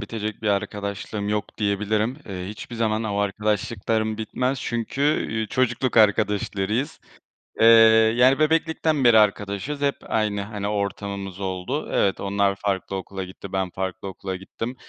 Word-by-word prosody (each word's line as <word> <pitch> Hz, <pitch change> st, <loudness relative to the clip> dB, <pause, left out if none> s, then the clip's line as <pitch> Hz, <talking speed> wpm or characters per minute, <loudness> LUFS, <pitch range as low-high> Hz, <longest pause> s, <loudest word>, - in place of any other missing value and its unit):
bitecek 110 Hz, -1 st, -5 dB
bir 105 Hz, -, 0 dB
arkadaşlığım 100 Hz, +1 st, -2 dB
yok 105 Hz, 0 st, -3 dB
diyebilirim. 105 Hz, +3 st, 0 dB
Eee, 90 Hz, -1 st, -5 dB
hiçbir 110 Hz, +3 st, -8 dB
zaman 110 Hz, -1 st, 0 dB
o 105 Hz, -2 st, -2 dB
arkadaşlıklarım 105 Hz, +2 st, -1 dB
bitmez 125 Hz, +4 st, -1 dB
çünkü, 120 Hz, +3 st, -3 dB
üüü, 110 Hz, -7 st, 0 dB
çocukluk 130 Hz, 0 st, 0 dB
arkadaşlarıyız. 105 Hz, +4 st, +1 dB, 0.6 s
Eee, 115 Hz, -, +5 dB, 0.5 s
yani 130 Hz, +3 st, +5 dB
bebeklikten 160 Hz, -1 st, +1 dB
beri 120 Hz, -2 st, +7 dB
arkadaşız. 105 Hz, +6 st, 0 dB
Hep 140 Hz, -1 st, +1 dB
aynı, 105 Hz, -2 st, -1 dB
hani, 100 Hz, 0 st, -4 dB
ortamımız 100 Hz, -2 st, -3 dB
oldu. 95 Hz, +9 st, -3 dB
Evet 95 Hz, -, +1 dB
onlar 100 Hz, 0 st, +1 dB
farklı 95 Hz, -1 st, -2 dB
okula 95 Hz, 0 st, -5 dB
gitti. 95 Hz, +1 st, -10 dB
Ben 95 Hz, -1 st, 0 dB
farklı 95 Hz, +1 st, -4 dB
okula 95 Hz, 0 st, -5 dB
gittim. 115 Hz, +6 st, -6 dB
105 Hz, 135 wpm, -24 LUFS, 100-115 Hz, 0.6 s, beri